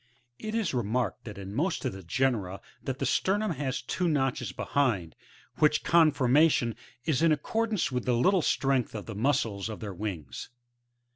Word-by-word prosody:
It 215 0 -4
is 215 -10 0
remarked 120 -4 -1
that 105 -3 -8
in 100 0 -7
most 165 - -1
of - - -1
the 95 - -8
genera 100 -1 0 0.2
that 130 -2 -4
the - - -2
sternum 205 +2 +1
has 135 -5 -3
two 180 +8 -1
notches 135 - 0
behind, 100 - 0 0.4
which 150 -1 +3
conformation 150 -5 +4 0.3
is 155 -4 +1
in 165 -1 +5
accordance 210 +5 0
with 125 -2 -2
the 125 -2 +2
little 185 +8 +4
strength 135 -5 +1
of 105 - -5
the 110 - -6
muscles 115 -3 0
of 110 - -6
their 105 -3 -5
wings. 85 -8 -5
130 Hz, 165 wpm, -29 LUFS, 105-155 Hz, 0.4 s, in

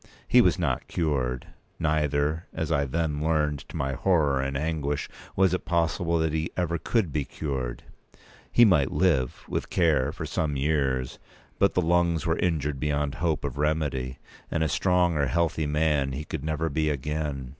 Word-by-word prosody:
He - - +6
was - - +3
not - - -1
cured; 65 -7 -1 0.3
neither, 75 0 0
as 80 -2 -2
I 70 -3 +2
then 75 +1 -1
learned 75 -2 +1
to - - -10
my 70 0 -1
horror 75 -3 +2
and 70 0 -2
anguish, 75 -2 -2 0.3
was 95 -1 +3
it 90 - -1
possible 85 0 +1
that 80 -1 0
he 80 +1 -1
ever 85 -2 0
could 95 - 0
be 75 - 0
cured. 65 -5 -4 0.7
He 120 - +7
might 80 -10 +3
live, 70 -9 +1
with - - -3
care, 75 -6 +2
for 85 0 -6
some 75 0 -1
years; 65 -3 0 0.4
but 100 - +3
the 90 - +2
lungs 85 -1 +2
were 80 -1 0
injured 75 -5 0
beyond 75 -1 0
hope 80 -4 0
of 70 - -4
remedy, 75 -4 -1 0.3
and 80 - 0
a - - +2
strong 90 +2 +2
or 70 -1 +2
healthy 80 +2 0
man 75 -2 +1
he 75 +3 -5
could 80 -3 -5
never 80 +1 -1
be 75 +1 0
again. 75 -2 -3
75 Hz, 175 wpm, -26 LUFS, 70-80 Hz, 0.7 s, He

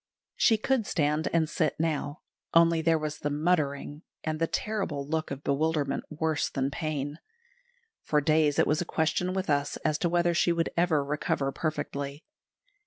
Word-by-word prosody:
She 225 - +4
could 230 0 0
stand 150 0 +1
and 165 -2 +2
sit 155 -2 0
now, 155 -2 -1 0.3
only 165 -1 +5
there 165 0 +3
was 155 -1 -4
the 145 - -1
"muttering," 150 -1 0 0.2
and 155 -1 -2
the 165 - +2
terrible 190 -11 -2
look 160 +1 -1
of 140 +1 -6
bewilderment 145 0 0
worse 155 0 -1
than 135 0 -1
pain. 145 0 -3 0.8
For 150 - +2
days 150 0 +3
it - - +5
was 150 +2 +1
a - - +1
question 170 +2 0
with 190 - -1
us 145 -1 0
as 155 -1 +1
to 175 - +1
whether 175 0 +2
she 175 +1 +3
would 170 -1 0
ever 165 -5 +2
recover 140 -1 -1
perfectly. 145 -1 -3
155 Hz, 170 wpm, -28 LUFS, 145-165 Hz, 0.8 s, only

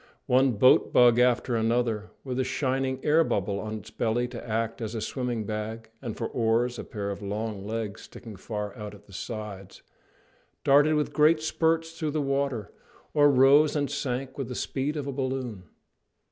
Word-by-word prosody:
One 130 0 +3
boat 130 +5 +5
bug 120 -1 +6
after 125 0 +2
another, 115 -1 0
with 130 -1 -3
a - - +3
shining 130 0 -1
air 155 +2 +5
bubble 100 - -1
on 110 +1 -4
its 105 - -11
belly 120 +2 0
to 120 -1 -8
act 115 +2 -2
as 110 0 -4
a - - -2
swimming 120 0 -2
bag, 110 +2 -5
and 120 -5 -5
for 115 - -2
oars 120 +1 0
a - - -4
pair 100 -2 -4
of 100 - -6
long 105 0 -4
legs 110 -1 -4
sticking 115 -3 -11
far 105 +1 -5
out 105 -1 -7
at 105 0 -18
the 100 - -17
sides, 100 -2 -7 0.8
darted 145 +3 +5
with 150 -1 -1
great 155 +1 +5
spurts 165 +1 0
through 165 -2 -3
the 155 +1 -1
water, 135 -6 -1 0.4
or 145 -1 +6
rose 140 +3 +5
and 145 -2 0
sank 135 -2 -3
with 135 - -2
the 125 - -6
speed 145 +5 -2
of 145 - -3
a 140 - -3
balloon. 130 -7 -3
120 Hz, 185 wpm, -27 LUFS, 110-135 Hz, 0.8 s, bug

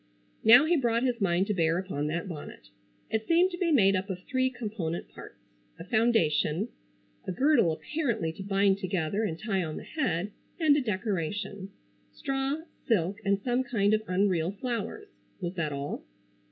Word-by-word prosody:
Now 245 +6 +8
he 345 +2 +3
brought 235 -4 +1
his 250 -3 0
mind 185 -1 +2
to 210 - -1
bear 165 -2 +2
upon 165 -6 -2
that 165 +4 -2
bonnet. 145 - -9 0.4
It 220 0 -1
seemed 350 +3 +4
to 350 - -5
be 345 -3 +1
made 200 -9 +5
up 190 +2 -2
of 185 -1 -5
three 260 -1 +1
component 210 -9 -4
parts—a - - -14
foundation: 175 -9 +2 0.6
a - - -1
girdle 255 - +3
apparently 225 - -2
to 180 - -9
bind 195 0 +2
together 185 +1 -1
and 165 -7 -2
tie 195 -1 -1
on 155 -2 -5
the - - -7
head; 210 - -1 0.3
and 310 -3 +5
a 295 - +2
decoration. 200 - -3 0.4
Straw, 270 +3 -2 0.3
silk 200 -2 +1
and 200 0 +2
some 250 +1 +1
kind 215 -5 +1
of 215 - +3
unreal 180 -3 +1
flowers. 245 - -4 0.3
Was 175 -2 -3
that 165 -5 -2
all? 140 0 -4
200 Hz, 165 wpm, -29 LUFS, 170-245 Hz, 0.6 s, Now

